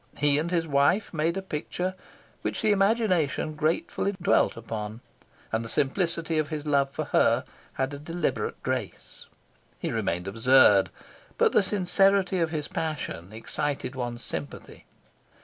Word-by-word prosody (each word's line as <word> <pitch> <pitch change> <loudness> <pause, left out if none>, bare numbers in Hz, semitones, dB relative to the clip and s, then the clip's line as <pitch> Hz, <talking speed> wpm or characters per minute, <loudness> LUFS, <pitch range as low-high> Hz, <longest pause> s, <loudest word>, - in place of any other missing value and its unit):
He 145 0 +3
and 165 +3 -2
his 170 -2 0
wife 145 +9 +2
made 165 +3 0
a 195 - -3
picture 180 +2 -3 0.5
which - - -2
the 215 - +4
imagination 195 - +2
gratefully 160 +5 -1
dwelt 180 -7 +2
upon, 110 0 -6 0.5
and 110 +1 0
the 115 - -7
simplicity 165 - 0
of 155 -1 -1
his 155 -2 -4
love 140 -2 +2
for 140 - -4
her - - +4 0.3
had 135 +1 -2
a 140 - -6
deliberate 150 - -3
grace. - - -5 0.5
He - - -3
remained 90 +2 -2
absurd, 110 -3 +5 0.5
but - - +4
the - - +4
sincerity 195 -1 +2
of 165 -1 +1
his 155 -3 -3
passion 145 - -4
excited 125 +4 -2
one's 120 -2 -4
sympathy. 75 -3 -7
150 Hz, 145 wpm, -27 LUFS, 125-175 Hz, 0.5 s, absurd